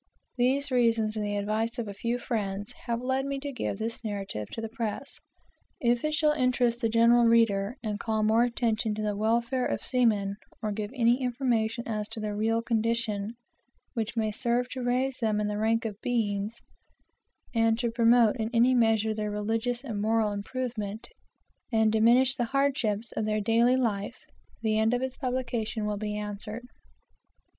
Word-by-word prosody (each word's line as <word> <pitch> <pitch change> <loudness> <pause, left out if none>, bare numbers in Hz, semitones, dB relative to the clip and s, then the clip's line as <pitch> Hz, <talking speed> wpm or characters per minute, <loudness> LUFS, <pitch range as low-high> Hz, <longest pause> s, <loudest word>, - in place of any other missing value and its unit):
These 265 +3 +1
reasons, 230 -3 +2
and 215 - -2
the 205 0 -1
advice 220 +4 -1
of 235 -3 -3
a 200 - -5
few 235 +4 -2
friends, 205 -4 -3 0.2
have 235 +1 -1
led 260 +1 0
me 275 0 -3
to 285 0 -4
give 245 -6 -3
this 225 +2 -4
narrative 195 - -4
to - - -6
the 225 - -3
press. 230 +4 -4 0.6
If 240 -1 +1
it 305 0 0
shall 305 0 +3
interest 250 -4 +1
the 230 - +2
general 235 +1 +5
reader, 230 -1 +3
and 210 -2 -3
call 220 0 -1
more 220 +2 +4
attention 230 -3 0
to 215 - -3
the 210 -1 -1
welfare 235 +4 +1
of - - -3
seamen, 210 -6 +1 0.2
or 215 -2 -2
give 205 0 -3
any 240 +1 +3
information 235 -2 0
as 215 -2 -3
to - - -6
their 210 -1 -3
real 225 +2 +1
condition, 225 -2 -1 0.6
which 225 -2 -3
may 215 -1 +1
serve 240 +2 0
to 255 - -5
raise 255 +2 0
them 215 -3 +1
in 210 - 0
the 210 0 -2
rank 225 +2 +1
of 210 -2 -5
beings, 220 -2 -1 0.9
and 225 -1 +3
to 235 -1 -1
promote 230 0 +4
in 220 -1 -2
any 245 +3 +5
measure 225 -2 +3
their 210 -1 -3
religious 225 +4 -1
and 220 -7 -4
moral 220 0 +2
improvement, 215 0 -4 0.6
and 220 -1 +3
diminish 240 +4 +4
the 240 - 0
hardships 245 -5 0
of 220 - -2
their 215 0 0
daily 230 +4 +3
life, 210 -5 -1 0.5
the 215 -1 +2
end 220 +2 +3
of 245 - -2
its 260 0 -3
publication 240 -4 -2
will 210 -1 -1
be 210 0 -3
answered. 210 +3 -6
225 Hz, 180 wpm, -28 LUFS, 215-245 Hz, 0.9 s, general